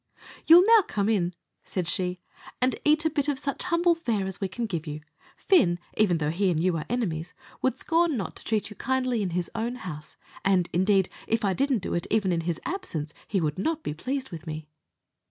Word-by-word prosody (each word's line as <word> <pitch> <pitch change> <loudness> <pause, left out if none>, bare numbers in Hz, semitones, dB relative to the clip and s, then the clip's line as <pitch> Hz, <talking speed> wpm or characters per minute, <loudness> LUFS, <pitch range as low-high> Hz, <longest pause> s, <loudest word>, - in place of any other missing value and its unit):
"You'll 345 +3 +9
now 450 0 +7
come 210 - -1
in," 180 -5 +1 0.3
said 180 -3 -3
she, 180 0 -1 0.4
"and 255 +1 +2
eat 305 +2 +3
a - - +4
bit 290 -1 0
of 290 -2 0
such 280 +4 -3
humble 345 -1 +3
fare 235 - -1
as 190 +1 -4
we 195 - 0
can 230 +6 -3
give 170 -6 -4
you. 150 0 -5 0.4
Fin, 240 - +4 0.2
even 210 -5 +3
although 150 -2 0
he 190 +3 +1
and 165 -3 +1
you 180 +1 +2
are 155 - -5
enemies, 180 -9 -2 0.3
would 260 -1 +1
scorn 330 0 +2
not 195 -6 -4
to - - -5
treat 215 -1 -1
you - - -9
kindly 255 -2 0
in 195 - -1
his 175 - -2
own 230 +2 -2
house; 155 -10 -8 0.3
and, 185 -3 +2
indeed, 190 +1 +3 0.2
if 225 -1 +1
I 195 - +2
didn't 265 -3 +1
do - - -3
it 170 - -1
even 205 -4 +2
in 170 -1 +1
his 165 -1 -2
absence, 165 - -3
he 200 - 0
would 155 -1 -1
not 320 +8 -1
be - - -3
pleased 260 - -4
with 165 -1 -8
me." 155 0 -5
200 Hz, 220 wpm, -27 LUFS, 175-265 Hz, 0.4 s, You'll